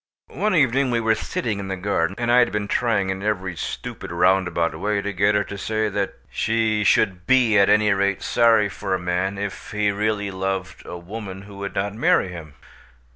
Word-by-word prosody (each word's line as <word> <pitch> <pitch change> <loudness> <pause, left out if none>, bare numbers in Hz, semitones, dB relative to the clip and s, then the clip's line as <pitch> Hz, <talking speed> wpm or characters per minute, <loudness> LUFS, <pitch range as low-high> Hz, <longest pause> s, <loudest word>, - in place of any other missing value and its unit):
One 210 -2 0
evening 135 -3 +3
we 120 -1 +1
were 110 -1 +2
sitting 110 -1 -3
in 100 - -5
the 95 - -3
garden, 95 -2 -1
and 120 0 0
I 125 - +6
had 120 - +3
been 105 -1 -2
trying 100 -5 +1
in 95 0 -5
every 95 -3 -2
stupid 80 - -6
roundabout 90 -1 +2
way 105 +2 0
to 100 0 -3
get 100 +3 +2
her 105 - +2
to 100 +1 -8
say 110 +1 -1
that 100 -1 -2 0.2
she 110 -1 0
should 95 -3 +2
be 125 -4 +4
at 100 - +4
any 105 -1 +4
rate 100 0 0
sorry 115 -3 +4
for 95 -1 -3
a - - -3
man, 90 +3 -1
if 100 +1 -6
he 105 -1 +1
really 105 0 -1
loved 95 -1 -4
a 90 - -6
woman 95 +1 -8
who 100 0 -12
would 100 0 -6
not 100 +1 -1
marry 105 -3 +2
him. 80 -5 -10
100 Hz, 205 wpm, -22 LUFS, 95-110 Hz, 0.2 s, I